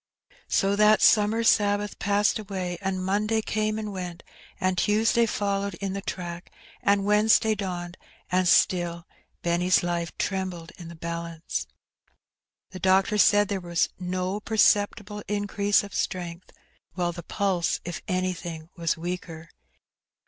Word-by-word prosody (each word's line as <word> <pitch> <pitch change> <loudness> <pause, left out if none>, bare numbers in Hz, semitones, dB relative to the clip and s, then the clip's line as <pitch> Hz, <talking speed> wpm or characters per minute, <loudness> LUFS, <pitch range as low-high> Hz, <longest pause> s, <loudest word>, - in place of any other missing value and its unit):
So 195 +1 +2
that 210 0 +5
summer 220 +1 +4
Sabbath 205 -2 +2
passed 205 +1 +2
away, 185 -4 -4
and 190 -1 -2
Monday 210 +3 +1
came 215 0 -1
and 210 -2 -4
went, 180 -2 -6 0.4
and 185 -1 +1
Tuesday 225 +5 +2
followed 200 -2 -1
in 195 +2 -4
the 200 - -4
track, 175 -2 -6 0.3
and 200 -1 +2
Wednesday 215 +1 +4
dawned, 180 -3 -5 0.3
and 185 0 +2
still 175 -1 +2 0.4
Benny's 175 +2 +2
life 170 -1 -2
trembled 185 -4 -3
in 170 - -8
the 170 - -9
balance. 170 0 -4 1.0
The 185 - -8
doctor 190 +3 +3
said 205 0 +5
there 200 -2 -2
was 175 -1 0
no 185 +2 -2
perceptible 210 -1 +2
increase 205 0 +1
of 200 - -10
strength, 175 -1 -4 0.4
while 175 -2 -1
the 175 - -8
pulse, 185 0 0
if 175 -1 -5
anything, 175 -3 -3
was 165 -2 -1
weaker. 170 -1 -6
190 Hz, 135 wpm, -26 LUFS, 175-205 Hz, 1.0 s, that